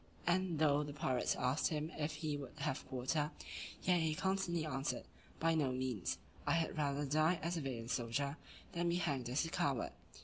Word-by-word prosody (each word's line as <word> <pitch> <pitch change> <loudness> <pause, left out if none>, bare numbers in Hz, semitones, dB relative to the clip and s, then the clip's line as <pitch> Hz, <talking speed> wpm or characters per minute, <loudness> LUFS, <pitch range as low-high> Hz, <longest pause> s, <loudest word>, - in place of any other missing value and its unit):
And 180 -1 +2
though 145 -1 +4
the 145 -1 -4
pirates 135 -4 +1
asked 130 +4 +2
him 155 +1 -1
if 155 0 -1
he 155 -2 -1
would 140 -3 -7
have 135 - -1
quarter; 140 +4 0 0.5
yet 180 -1 +4
he 160 -1 +1
constantly 185 -3 +1
answered, 135 -2 -1 0.4
"By 165 0 +4
no 145 -5 +2
means, 125 -6 -1 0.3
I - - +4
had 165 -1 +1
rather 145 -1 +1
die 155 +5 +3
as 170 +2 0
a 165 - -1
valiant 120 -4 -3
soldier, 140 +5 0 0.3
than 175 -1 +1
be 170 - +2
hanged 140 -8 0
as 130 +6 +2
a - - -3
coward." 140 -6 +1
150 Hz, 190 wpm, -38 LUFS, 135-165 Hz, 0.5 s, though